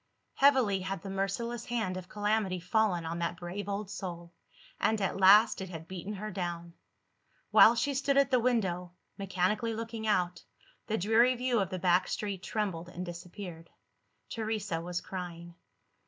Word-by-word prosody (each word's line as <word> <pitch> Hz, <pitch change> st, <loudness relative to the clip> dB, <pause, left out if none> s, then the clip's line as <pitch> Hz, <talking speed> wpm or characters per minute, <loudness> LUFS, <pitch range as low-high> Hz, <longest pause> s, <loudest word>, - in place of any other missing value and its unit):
Heavily 260 Hz, -8 st, +4 dB
had 190 Hz, -1 st, -4 dB
the 195 Hz, -, -5 dB
merciless 215 Hz, +5 st, -2 dB
hand 220 Hz, -6 st, -2 dB
of 185 Hz, -1 st, -7 dB
calamity 205 Hz, -3 st, 0 dB
fallen 180 Hz, -2 st, +1 dB
on 165 Hz, +1 st, -3 dB
that 170 Hz, 0 st, -2 dB
brave 185 Hz, +4 st, -5 dB
old 200 Hz, 0 st, -3 dB
soul 175 Hz, -4 st, -6 dB, 0.5 s
and, 220 Hz, 0 st, +2 dB
at 195 Hz, -1 st, -1 dB
last, 205 Hz, +3 st, +7 dB
it 190 Hz, -, -5 dB
had 165 Hz, -2 st, -8 dB
beaten 190 Hz, +3 st, -6 dB
her 210 Hz, +1 st, -5 dB
down! 175 Hz, -2 st, -4 dB, 0.8 s
While 230 Hz, -, +8 dB
she 280 Hz, +4 st, 0 dB
stood 275 Hz, +1 st, +1 dB
at 280 Hz, -1 st, +4 dB
the 255 Hz, -, +5 dB
window, 190 Hz, -8 st, 0 dB, 0.3 s
mechanically 195 Hz, +4 st, 0 dB
looking 225 Hz, 0 st, -5 dB
out, 180 Hz, -4 st, +1 dB, 0.4 s
the 220 Hz, -, 0 dB
dreary 225 Hz, +6 st, +4 dB
view 250 Hz, -1 st, +1 dB
of 190 Hz, -3 st, 0 dB
the 185 Hz, -, -3 dB
back 180 Hz, +1 st, +3 dB
street 200 Hz, -3 st, -3 dB
trembled 185 Hz, -6 st, -3 dB
and 180 Hz, 0 st, -6 dB
disappeared. 175 Hz, -1 st, -8 dB, 0.6 s
Teresa 215 Hz, -6 st, -3 dB
was 175 Hz, +1 st, -3 dB
crying. 175 Hz, -2 st, -7 dB
195 Hz, 160 wpm, -31 LUFS, 175-220 Hz, 0.8 s, While